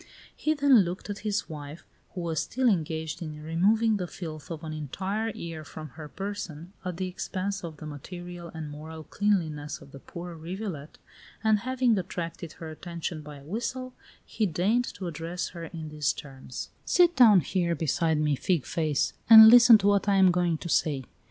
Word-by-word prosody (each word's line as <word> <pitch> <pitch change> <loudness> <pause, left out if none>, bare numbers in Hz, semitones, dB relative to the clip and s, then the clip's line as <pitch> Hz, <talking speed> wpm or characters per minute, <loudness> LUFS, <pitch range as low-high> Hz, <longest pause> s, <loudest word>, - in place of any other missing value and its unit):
He 310 0 0
then 280 -4 +6
looked 185 +2 -2
at 205 - -6
his 210 -1 -2
wife, 150 0 -9 0.3
who 180 - -3
was 165 -2 -1
still 260 +1 0
engaged 160 -4 -1
in 155 -2 -6
removing 210 +7 +2
the 180 -2 -3
filth 160 -5 -8
of 165 -1 -6
an 155 -1 -5
entire 190 +9 -3
year 165 -6 -7
from 155 +1 -9
her 150 +4 -10
person, 185 -3 -6
at 180 -2 -4
the 185 0 -2
expense 185 +2 -4
of 160 -3 -7
the 155 - -9
material 175 +4 -8
and 155 -2 -7
moral 155 +2 -8
cleanliness 160 -7 -1
of 140 - -15
the 140 - -10
poor 175 +4 -8
rivulet, 165 -2 -6 0.5
and 220 -1 +4
having 255 0 +1
attracted 170 -2 -5
her 160 -1 -8
attention 170 0 -5
by 150 0 -10
a 140 - -14
whistle, 250 - -4 0.3
he 215 - -1
deigned 200 +9 +1
to 190 - -8
address 165 +1 -4
her 170 -2 -8
in 160 -2 -7
these 150 -2 0
terms: 135 -3 -8
"Sit 350 -1 +4
down 215 -7 +7
here 170 +3 0
beside 160 +1 +1
me, 150 -1 +2
fig 160 -1 0
face, 155 -4 0 0.2
and 220 -1 +12
listen 240 -1 +9
to 200 - -4
what 205 0 +3
I 200 - +4
am 190 -2 +6
going 175 -2 +1
to 170 - -7
say. 145 -4 +1
170 Hz, 185 wpm, -27 LUFS, 155-200 Hz, 0.5 s, and